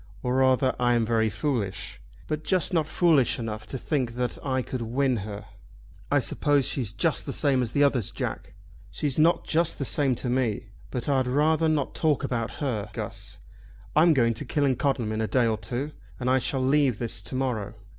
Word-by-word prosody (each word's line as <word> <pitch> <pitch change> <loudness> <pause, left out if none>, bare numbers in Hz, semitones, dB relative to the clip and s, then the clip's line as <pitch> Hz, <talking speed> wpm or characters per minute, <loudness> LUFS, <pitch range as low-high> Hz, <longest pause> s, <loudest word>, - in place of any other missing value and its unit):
Or 125 -1 0
rather 130 0 +3
I 120 0 +3
am 115 -1 +2
very 110 -1 +2
foolish, 105 - -3 0.2
but 155 0 -3
just 185 +2 +1
not 160 -3 +2
foolish 155 -7 +3
enough 110 -3 -5
to 135 - -4
think 125 -4 -2
that 125 0 -2
I 130 -2 0
could 130 0 -5
win 125 +2 0
her." 105 0 -6 0.6
"I - - +3
suppose 145 -2 +2
she's 120 -7 -2
just 160 +8 0
the - - -2
same 135 -2 +1
as 120 -3 -3
others, 140 -7 +3
Jack." - - -5 0.3
"She's 145 -1 -1
not 165 +2 +3
just 165 +1 +1
the 140 - -2
same 135 -1 +1
to 125 - -4
me. 120 -4 -1 0.2
But 125 -3 -4
I'd 135 -3 +2
rather 155 +5 +2
not 150 -3 0
talk 155 -4 +1
about 115 -2 -2
her, 110 -7 -3
Guss. - - -6 0.6
I'm 160 +1 +5
going 115 -3 +3
to 110 - -3
Killancodlem 135 -4 0
in 110 0 -1
a 110 - 0
day 125 0 +2
or 110 -2 0
two, 135 +5 -4 0.3
and 125 0 0
I 130 - +4
shall 130 +1 -1
leave 135 -3 +3
this 115 -5 -2
to 105 - -6
morrow!" 120 -5 -2
130 Hz, 195 wpm, -26 LUFS, 115-145 Hz, 0.6 s, I'm